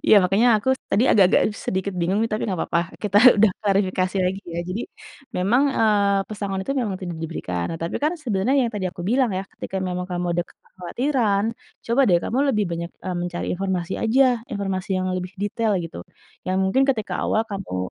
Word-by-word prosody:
Iya 215 - +7
makanya 195 +7 +3
aku 260 - +2 0.2
tadi 225 - +3
agak 200 - +6
agak - - +5 0.2
sedikit 190 +1 -1
bingung 185 +5 +1
nih 225 - -1
tapi 215 0 -1
nggak 185 -6 -2
papa, 170 - 0 0.2
kita 205 -1 +3 0.2
udah 210 0 +5
klarifikasi 195 -2 0
lagi 190 +2 -1
ya. 170 - -1
Jadi 200 +6 -3 0.5
memang, 215 +9 +3
eee, 200 -2 +3
pesangon 195 -2 -3
itu 275 - -2
memang 215 -6 -1
tidak 175 -3 -5
diberikan, 90 - -4
nah - - -6
tapi 165 - -2
kan 305 +4 0
sebenernya 245 - -1
yang - - -7
tadi 205 -4 -3
aku 175 -1 -6
bilang 240 +3 +1
ya, 190 - -2
ketika 190 0 -4
memang 180 -1 -3
kamu 180 -1 -3
ada - - +3
kekhawatiran, 210 +2 -1 0.4
coba 235 +4 +2
deh 175 -3 +4
kamu 245 - -2 0.2
lebih 210 -1 +1
banyak, 170 0 -4
eee, 185 -1 -3
mencari 175 0 -3
informasi 185 -1 -2
aja, 235 +5 +3 0.2
informasi 195 -2 -3
yang 185 0 -1
lebih 185 0 -4
detail 210 +1 0
gitu. 120 - -8 0.4
Yang 185 +1 0
mungkin 190 +8 +2
ketika 235 -7 -1
awal 220 - +2
kamu, 95 - -4
195 Hz, 195 wpm, -23 LUFS, 180-215 Hz, 0.5 s, Iya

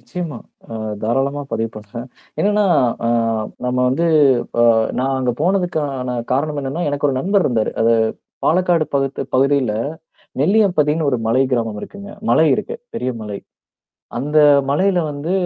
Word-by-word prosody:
நிச்சயமா. 170 -9 -6 0.3
நான் 110 -2 -5
தாராளமா 135 +5 0
பதிவு 115 0 -1
பண்ணுறேன். 110 +4 -8 0.3
என்னன்னா 210 0 +2 0.4
அ - - +1 0.6
நம்ம 125 0 -1
வந்து 165 +7 +1 0.6
இப்ப 110 - +4 0.2
நான் 135 +1 0
அங்க 125 -1 0
போனதுக்கான 155 -8 -1 0.2
காரணம் 145 +2 0
என்னன்னா, 140 +6 -3
எனக்கு 145 0 0
ஒரு 130 - -1
நண்பர் 195 +5 +2
இருந்தாரு. 115 -4 0
அது 115 +1 +4 0.5
பாலக்காடு 175 -2 +2
பகுத்-பகுதியில, 135 -2 +1 0.7
நெல்லியம்பதின்னு 160 -4 +2
ஒரு 125 - +1
மலை 125 +4 +3
கிராமம் 115 -4 -1
இருக்குங்க. 200 0 -9 0.2
மலை 160 - +5
இருக்கு. 470 - -4 0.2
பெரிய 130 - -2
மலை. 105 -2 -5 0.8
அந்த 150 +4 +1 0.3
மலையில 185 +5 +2
வந்து, 145 +5 -4
140 Hz, 130 wpm, -19 LUFS, 125-170 Hz, 0.8 s, மலை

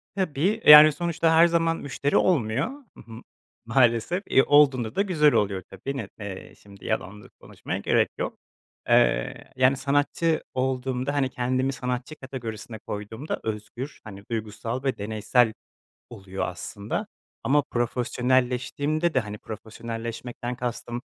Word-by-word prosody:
Tabii. 165 -8 -2 0.2
Eee, 150 - +10
yani, 150 +1 +11
sonuçta 165 0 0
her 165 +1 +7
zaman 165 -1 +1
müşteri 145 +1 -1
olmuyor. 135 -5 +2
Hı 270 -3 -13
hı. 115 +1 -10 0.4
Maalesef, 120 - +2
eee, 135 - +5
olduğunda 135 -6 +4
da - - +2
güzel 160 -7 +3
oluyor 100 -2 0
tabii. 135 +9 -6
Ne - - -4
eee, 100 -3 -8
şimdi 100 -1 -16
yalan 105 -2 -3
da - - -15
konuşmaya - - -6
gerek - - +2
yok. - - -4 0.5
Eee, - - +2
yani, 130 +1 +3
sanatçı 145 +4 0
olduğumda, 130 +1 -1
hani, 140 -2 +1
kendimi 130 +2 -1
sanatçı 125 +2 -4
kategorisine 120 -5 -7
koyduğumda 105 +7 -5
özgür, 110 +6 -6
hani, 100 -3 -10
duygusal 115 +3 -4
ve 135 -2 -1
deneysel 110 +3 +1 0.6
oluyor 95 0 -5
aslında 100 - -5 0.4
ama 145 +2 +3
profesyonelleştiğimde 130 +6 0
de, 130 - +3
hani, 105 -2 -6
profesyonelleşmekten 115 +3 -6
kastım, 120 -1 -4
125 Hz, 135 wpm, -25 LUFS, 110-145 Hz, 0.6 s, yani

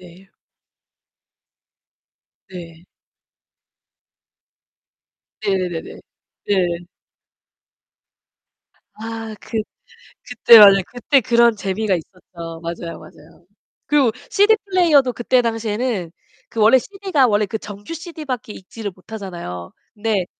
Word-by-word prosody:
네. 180 +2 -16 2.2
네. 170 -2 -11 2.6
네네네네. 185 -5 -3 0.5
네. 180 -4 +1 2.2
아 225 0 -7
그 225 - -5 0.7
그때 235 -1 +7
맞아요. 195 -2 +8
그때 250 +3 +2
그런 235 0 +3
재미가 200 0 -1
있었죠. 170 -1 -9
맞아요, 170 0 -6
맞아요. - - -17 0.4
그리고 280 -6 +3 0.2
CD 415 +2 +4
플레이어도 325 -10 +3
그때 245 +2 +2
당시에는 225 -5 -2 0.4
그 230 - -6
원래 220 +5 +6
CD가 375 -5 0
원래 210 -1 +2
그 210 +3 -4
정규 205 +5 -9
CD밖에 305 -9 -6
읽지를 205 +2 -8
못하잖아요. 180 - -8 0.2
근데 210 -4 -1
215 Hz, 210 characters per minute, -20 LUFS, 185-245 Hz, 2.6 s, 맞아요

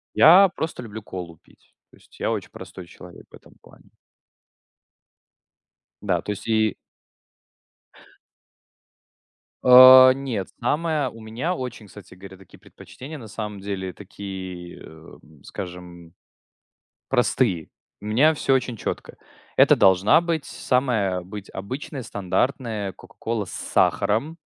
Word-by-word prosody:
Я 185 +5 +7
просто 160 -6 -5
люблю 110 -1 -9
колу 90 -5 -9
пить. - - -28 0.2
То - - -21
есть - - -22
я - - -1
очень - - -4
простой 90 -2 -11
человек 90 -1 -14
в - - -29
этом - - -17
плане. - - -21 2.1
Да, 90 -4 0
то 105 - -4
есть 105 - -9
и 110 -2 +2 2.9
А, 130 +1 +10
нет, 130 -8 -4
самое 150 +2 0
У 115 - -13
меня 120 +11 -3
очень, 125 -7 -7
кстати 95 -2 -14
говоря, 95 +1 -13
такие 95 -2 -18
предпочтения 150 +5 -12
на 115 - -11
самом 105 -1 -6
деле, 95 -2 -5
такие, 95 -2 -9
эм, 80 -2 -16
скажем, 90 -2 -9 0.9
простые. 120 - 0 0.3
У 105 - -10
меня 145 +9 +3
всё 135 -2 +1
очень 125 -3 -1
четко. - - -6 0.4
Это - - +6
должна 95 - +4
быть 165 -4 -2
самая 115 -8 -1
обыд 95 +2 -10
обычная, 130 +7 -6
стандартная 105 +1 -2
кока-кола 110 +1 -5
с - - -12
сахаром. 110 +11 0
105 Hz, 120 wpm, -23 LUFS, 95-130 Hz, 2.9 s, А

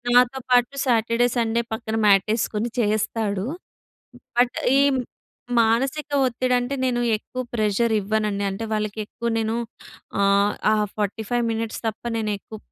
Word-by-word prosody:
నాతో 250 +2 +4
పాటు 245 +2 +3
Saturday, 230 -1 +2
Sunday 230 0 +1
పక్కన 220 0 -3
మ్యాటేసుకొని 215 +3 +2
చేస్తాడు. 210 -2 0 0.9
బట్, 245 +1 +3 0.2
ఈ - - +5 0.8
మానసిక 265 +7 +1 0.2
ఒత్తిడి 255 +1 0
అంటే, 245 +3 -2
నేను 245 -2 +1 0.2
ఎక్కువ 255 +4 -6
ప్రెషర్ 220 +1 +1
ఇవ్వనండి. 210 0 -1
అంటే 195 +4 -4
వాళ్ళకి 215 0 -2
ఎక్కువ 235 +2 -4
నేను 225 0 -1 0.7
ఆహ్, 200 +1 +3 0.2
ఆ - - +4 0.2
45 220 +3 -1
మినిట్స్ 225 0 -3
తప్ప 220 - -6 0.2
నేను 215 -1 -1
ఎక్కువ 220 +2 -11
225 Hz, 125 wpm, -23 LUFS, 210-240 Hz, 0.9 s, ఈ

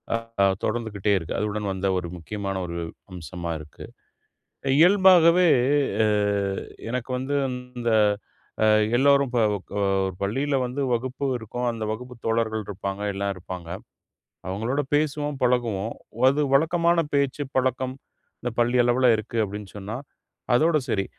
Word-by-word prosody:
ஆ - - +2 0.5
தொடர்ந்துகிட்டே 110 -3 -1
இருக்கு. 85 -3 -4
அதுவுடன் 105 -1 -2
வந்த 95 +1 -2
ஒரு 90 -1 -3
முக்கியமான 100 +3 -4
ஒரு 85 0 -5 0.4
அம்சமா 85 0 -6
இருக்கு. 75 -1 -11 0.9
இயல்பாகவே 180 -1 +6 0.6
அ - - +3 0.8
எனக்கு 125 0 -3
வந்து 130 +3 -2 0.4
இந்த 120 -1 0 0.7
அ - - +5 0.3
எல்லோரும் 140 0 +4
ப - - +2 0.4
அ - - +1 0.2
ஒரு 95 -1 -4
பள்ளியில 135 +8 0
வந்து 125 +3 -3
வகுப்பு 130 +3 -2
இருக்கும். 120 +2 -4
அந்த 115 -1 -5
வகுப்பு 125 +3 -8
தோழர்கள் 110 -1 0
இருப்பாங்க, 100 0 -5
எல்லாம் 100 0 -2
இருப்பாங்க. 90 -2 -8 0.8
அவுங்களோட 115 +9 -1
பேசுவோம், 150 -1 0
பழகுவோம். 115 -4 0 0.3
அது 140 +3 +1
வழக்கமான 170 +3 +3 0.2
பேச்சு, 140 +1 +1
பழக்கம். 130 0 0 0.5
இந்த 125 - -3
பள்ளி 120 +1 +2
அளவுல 120 +2 +3
இருக்கு 110 +2 -6
அப்பிடின்னு 105 -1 -6
சொன்னா, 105 +3 -5 0.6
அதோட 155 +5 +4
சரி. 100 -2 0
120 Hz, 125 wpm, -25 LUFS, 100-140 Hz, 0.9 s, இயல்பாகவே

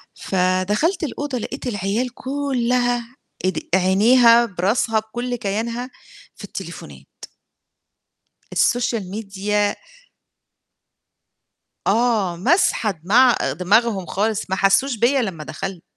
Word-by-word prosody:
فدَخَلت 190 - 0
الأوضة 285 -2 -3
لقيت 260 +3 -6
العيال 210 +3 -1
كُلّها 250 -3 -1 0.3
إد 185 -4 0 0.2
عينيها 230 +6 +5
براسها 215 +3 0
بكُلّ 240 +3 -4
كيانها 230 +3 -3 0.5
في - - -13
التليفونات. - - -9 1.5
الsocial 240 -3 +1
media 205 +1 -2 2.1
آه، 215 -5 +1
ماسحة 220 - +2
دماع 215 +10 +4 0.2
دماغهم 205 0 +2
خالص 215 0 -2
ما 190 - 0
حسّوش 195 +7 +2
بيّا 250 +4 +3
لمّا 175 -8 -4
دخلت. 190 +2 -6
220 Hz, 90 wpm, -21 LUFS, 195-245 Hz, 2.1 s, عينيها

